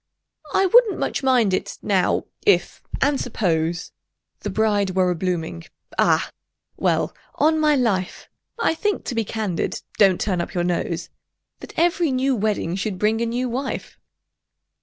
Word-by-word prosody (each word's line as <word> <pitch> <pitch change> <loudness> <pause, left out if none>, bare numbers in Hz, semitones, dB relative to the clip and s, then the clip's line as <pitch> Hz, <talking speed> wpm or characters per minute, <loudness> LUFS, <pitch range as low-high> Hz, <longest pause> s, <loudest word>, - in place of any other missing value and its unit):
"I 385 - +4
wouldn't 450 +2 +5
much - - -2
mind 250 -7 +3
it, - - -2
now—if—and 275 - 0
suppose— 170 -7 -1 0.5
The 205 - -4
bride 205 -2 +1
were 185 -1 +3
a - - -1
blooming—Ah! 170 -1 -1 0.4
well—on 315 +1 0
my 305 -1 +4
life, 205 -8 -1 0.3
I 465 - +2
think—to 400 -5 -2
be 230 -1 0
candid—(don't 200 -2 0
turn 185 -4 0
up 170 - -6
your 175 - +1
nose!) 175 -1 -2 0.5
That - - -12
every 340 -2 +2
new 260 +1 +1
wedding 205 -5 -1
should 190 0 -3
bring 215 +3 +1
a 235 - +1
new 245 +2 -1
wife!" 260 +3 -4
215 Hz, 130 wpm, -22 LUFS, 185-265 Hz, 0.5 s, wouldn't